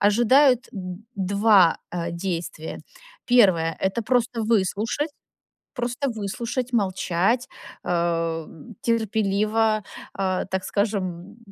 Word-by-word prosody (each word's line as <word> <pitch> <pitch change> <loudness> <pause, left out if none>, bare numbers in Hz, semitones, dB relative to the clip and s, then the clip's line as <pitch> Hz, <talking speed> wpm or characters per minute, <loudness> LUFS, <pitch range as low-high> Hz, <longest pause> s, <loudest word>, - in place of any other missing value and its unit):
ожидают 245 +5 +4
д 185 -3 -6 0.2
2, 200 -2 +4
а 170 -1 -3
действия. 170 -3 -4 0.5
1, 185 -10 +4
это 190 +5 0
просто 240 0 0
выслушать, 225 - 0 0.7
просто 250 +2 -2
выслушать, 235 +3 -4
молчать, 195 +3 +1 0.4
а, 165 -2 -1 0.3
терпеливо, 215 -1 +1 0.3
а, 190 -1 -1
так 190 0 -3
скажем, 200 -1 -2
200 Hz, 90 wpm, -24 LUFS, 180-230 Hz, 0.7 s, ожидают